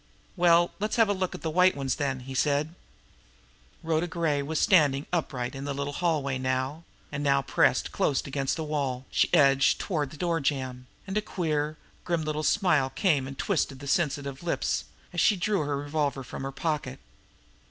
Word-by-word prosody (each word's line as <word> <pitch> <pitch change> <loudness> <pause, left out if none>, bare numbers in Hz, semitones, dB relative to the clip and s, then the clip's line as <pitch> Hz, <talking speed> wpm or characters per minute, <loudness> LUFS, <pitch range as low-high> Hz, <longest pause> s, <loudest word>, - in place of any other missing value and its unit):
"Well, 175 -1 +4
let's 210 +2 -1
have 225 -3 +4
a - - +3
look 185 -2 -2
at - - -10
the 160 - -1
white 180 +3 +4
ones, 135 -2 -1
then," 135 -3 -1
he 135 +1 -8
said. 145 +3 +1 1.1
Rhoda 165 +1 0
Gray 165 -4 0
was 155 +2 -2
standing 150 -8 +4
upright 125 -7 -2
in 135 0 -6
the 140 -1 -3
little 140 +1 -3
hallway 145 -6 0
now, 130 +5 -2 0.3
and 145 0 -3
now, 140 -1 +3
pressed - - +2
close 140 - 0
against 135 -1 -1
the 160 - -3
wall, 140 -4 -2
she - - +2
edged 140 -5 +5
toward 150 -7 -1
the 155 - -12
door 170 0 0
jamb. 130 -3 -2 0.2
And 200 +1 -1
a - - -3
queer, 155 -6 -2 0.3
grim 170 -2 -1
little 155 0 -2
smile 155 -6 +2
came 145 -6 +1
and 135 0 -8
twisted 155 -7 0
the 140 - -10
sensitive 140 -4 -1
lips, 170 -1 -1 0.3
as 175 - +1
she 210 - +5
drew 195 +2 0
her 145 -1 -1
revolver 145 -1 -2
from 125 - -8
her 135 0 -4
pocket. 145 -3 -3
150 Hz, 185 wpm, -27 LUFS, 135-170 Hz, 1.1 s, edged